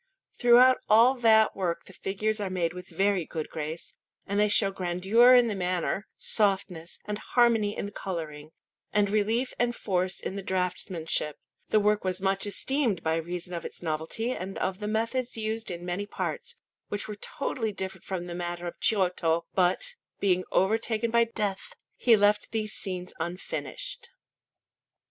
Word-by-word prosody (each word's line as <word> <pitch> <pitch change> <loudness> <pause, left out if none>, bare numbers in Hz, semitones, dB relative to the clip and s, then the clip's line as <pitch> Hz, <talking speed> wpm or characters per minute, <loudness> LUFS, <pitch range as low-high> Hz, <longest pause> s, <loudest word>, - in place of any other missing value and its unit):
Throughout 245 +2 +7
all 230 +4 +7
that 225 -4 +4
work 170 -3 -2
the 190 - -14
figures 215 +4 -2
are 200 -2 -2
made 175 -3 -1
with 180 0 -9
very 195 -2 +1
good 155 0 -5
grace, 155 +2 -5 0.3
and 200 +1 -1
they 210 - +5
show 200 -1 +4
grandeur 195 +7 +4
in 245 -1 +6
the 225 - -1
manner, 185 +1 -1
softness 190 -5 0
and 210 0 -3
harmony 225 -4 +2
in - - -2
the 205 - -6
colouring, 155 -7 -5 0.4
and 205 -1 +2
relief 220 +5 +1
and 240 0 +1
force 185 -2 -1
in 190 - -5
the 200 - -3
draughtsmanship; 180 -5 -2 0.3
the 215 - +4
work 210 0 +2
was 185 0 -1
much 195 +1 0
esteemed 240 - 0
by 160 0 +1
reason 175 +2 -5
of 170 - -4
its - - -7
novelty 160 +9 -2
and 195 -5 -5
of 190 +1 -2
the 210 - -4
methods 230 +3 -1
used 220 +1 -2
in 175 -1 -5
many 180 +3 -3
parts, 480 - -4 0.3
which 205 - -3
were 210 - -5
totally 225 +1 -3
different 190 -1 -5
from 185 -2 -4
the 175 - -6
manner 175 0 -4
of 175 - -6
Giotto; 180 -5 +2
but, 185 - +1 0.3
being 185 -2 +2
overtaken 225 +3 +1
by 235 0 +4
death, 210 -4 -3 0.2
he 235 -3 +5
left 205 +1 +3
these 215 -1 -2
scenes 180 -2 -4
unfinished. 175 +3 -5
195 Hz, 165 wpm, -28 LUFS, 180-220 Hz, 0.4 s, Throughout